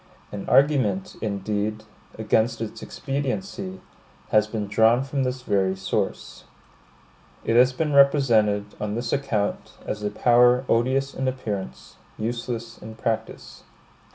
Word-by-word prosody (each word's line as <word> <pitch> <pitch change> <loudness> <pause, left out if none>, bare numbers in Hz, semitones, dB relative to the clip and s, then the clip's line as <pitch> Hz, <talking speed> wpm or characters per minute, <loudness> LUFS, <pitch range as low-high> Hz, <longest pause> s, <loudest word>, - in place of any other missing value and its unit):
An 100 -1 -6
argument, 130 -10 +2
indeed, 105 +1 -2 0.3
against 110 +2 +1
its 110 -1 -6
expediency, 185 +7 -4 0.5
has 105 0 +3
been 110 -1 -3
drawn 110 +5 +3
from 135 0 -2
this 130 0 -2
very 95 -4 +1
source. 95 0 -3 1.0
It 115 - 0
has 125 +2 +6
been 150 +3 -2
represented, 120 -8 +4 0.2
on 105 0 -2
this 120 +1 -3
account, 125 -8 -2
as 105 - -4
a 105 - -1
power 125 +3 +4
odious 130 +4 +1
in 130 - -2
appearance, 100 - -5 0.2
useless 115 0 -4
in 110 +1 -10
practice. 115 0 -4
115 Hz, 125 wpm, -24 LUFS, 105-130 Hz, 1.0 s, has